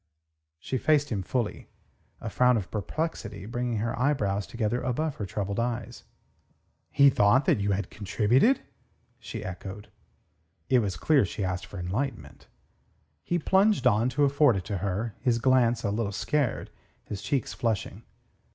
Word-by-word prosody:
She 130 Hz, +10 st, -3 dB
faced 145 Hz, -1 st, +2 dB
him 100 Hz, -4 st, -1 dB
fully, 115 Hz, +3 st, -3 dB, 0.5 s
a -, -, -6 dB
frown 125 Hz, -1 st, +4 dB
of 95 Hz, -5 st, -5 dB
perplexity 105 Hz, -, -4 dB
bringing 120 Hz, +1 st, -2 dB
her 120 Hz, +6 st, +1 dB
brows 100 Hz, -4 st, -1 dB
together 115 Hz, +1 st, -1 dB
above 145 Hz, +4 st, -2 dB
her 105 Hz, -, -4 dB
troubled 100 Hz, +1 st, -3 dB
eyes. 120 Hz, -1 st, -3 dB, 0.8 s
"He 140 Hz, -1 st, +5 dB
thought 110 Hz, +5 st, +4 dB
that -, -, +3 dB
you 100 Hz, 0 st, +1 dB
had 95 Hz, -1 st, -3 dB
contributed?" 110 Hz, -, +2 dB, 0.6 s
she 115 Hz, -2 st, -7 dB
echoed. 95 Hz, +2 st, -7 dB, 0.8 s
It 130 Hz, -, +5 dB
was 100 Hz, -5 st, -2 dB
clear 150 Hz, -4 st, +3 dB
she 100 Hz, +1 st, -3 dB
asked 90 Hz, 0 st, -3 dB
for 100 Hz, -, -9 dB
enlightenment. 90 Hz, -, -4 dB, 0.8 s
He 175 Hz, -, 0 dB
plunged 195 Hz, +2 st, +3 dB
on 115 Hz, 0 st, +4 dB
to 140 Hz, +4 st, +1 dB
afford 140 Hz, -3 st, +4 dB
it 95 Hz, -3 st, -4 dB
her, 100 Hz, +3 st, -2 dB
his 125 Hz, -3 st, +1 dB
glance 120 Hz, -1 st, +3 dB
a 100 Hz, -, 0 dB
little 105 Hz, -1 st, -1 dB
scared, 140 Hz, +4 st, -1 dB, 0.3 s
his 100 Hz, -1 st, -6 dB
cheeks 135 Hz, +3 st, -1 dB
flushing. 110 Hz, -2 st, -2 dB
115 Hz, 150 wpm, -27 LUFS, 100-130 Hz, 0.8 s, He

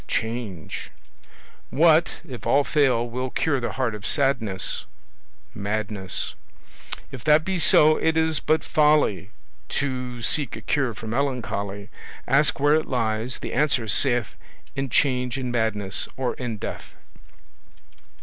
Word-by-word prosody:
Change. 110 Hz, -8 st, -4 dB, 0.8 s
What, 160 Hz, +3 st, +3 dB
if 125 Hz, -4 st, -7 dB
all 145 Hz, -, +4 dB
fail, 130 Hz, -6 st, +2 dB
will 125 Hz, +2 st, -3 dB
cure 140 Hz, +1 st, 0 dB
the 120 Hz, -, -3 dB
heart 130 Hz, -4 st, -1 dB
of 105 Hz, -1 st, -8 dB
sadness? 120 Hz, -10 st, 0 dB, 0.7 s
Madness. 100 Hz, -2 st, -3 dB, 0.8 s
If 130 Hz, -5 st, -8 dB
that 155 Hz, +1 st, +5 dB
be 190 Hz, -2 st, -1 dB
so, 155 Hz, -1 st, +6 dB
it 160 Hz, 0 st, +1 dB
is 160 Hz, -1 st, +2 dB
but 155 Hz, 0 st, +1 dB
folly 150 Hz, -, +2 dB, 0.4 s
To 125 Hz, -3 st, -3 dB
seek 145 Hz, -2 st, +2 dB
a 110 Hz, -, -8 dB
cure 130 Hz, -2 st, 0 dB
for 115 Hz, -, -9 dB
melancholy: 110 Hz, -5 st, -3 dB, 0.4 s
Ask 145 Hz, +2 st, +3 dB
where 145 Hz, +1 st, +4 dB
it 155 Hz, 0 st, +1 dB
lies; 115 Hz, 0 st, -1 dB
the -, -, -5 dB
answer 140 Hz, -5 st, +1 dB
saith 120 Hz, +1 st, +2 dB, 0.4 s
In 135 Hz, 0 st, -2 dB
Change, 125 Hz, 0 st, +1 dB
in 125 Hz, -2 st, -3 dB
Madness, 110 Hz, -4 st, -1 dB
or 130 Hz, -2 st, -1 dB
in 120 Hz, -4 st, -5 dB
Death. -, -, -7 dB
125 Hz, 130 wpm, -24 LUFS, 110-145 Hz, 0.8 s, so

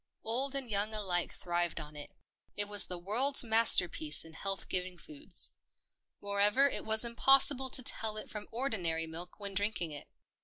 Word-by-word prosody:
Old 260 Hz, +5 st, -3 dB
and 270 Hz, -2 st, -2 dB
young 210 Hz, 0 st, -1 dB
alike 185 Hz, -5 st, -2 dB
thrived 175 Hz, -1 st, -4 dB
on 150 Hz, -1 st, -11 dB
it 145 Hz, -1 st, -11 dB, 0.3 s
— -, -, -46 dB
it 205 Hz, -, -3 dB
was 205 Hz, -1 st, +3 dB
the 180 Hz, -, -8 dB
world's 245 Hz, +11 st, +1 dB
masterpiece 180 Hz, -10 st, +3 dB
in 165 Hz, -, -15 dB
health 195 Hz, +4 st, -7 dB
giv 180 Hz, -, -1 dB
ing 180 Hz, -1 st, -12 dB
foods. 300 Hz, -, +4 dB, 0.7 s
Moreover 205 Hz, +7 st, +1 dB
it -, -, -3 dB
was 220 Hz, +1 st, +2 dB
impossible 265 Hz, +2 st, +3 dB
to 255 Hz, -, -4 dB
tell 220 Hz, -2 st, +1 dB
it 215 Hz, -, -6 dB
from 210 Hz, -1 st, -10 dB
ordinary 185 Hz, -10 st, -4 dB
milk 170 Hz, +4 st, -11 dB
when 200 Hz, -1 st, -8 dB
drinking 200 Hz, -4 st, -3 dB
it. 145 Hz, -, -11 dB
205 Hz, 180 wpm, -30 LUFS, 175-235 Hz, 0.7 s, foods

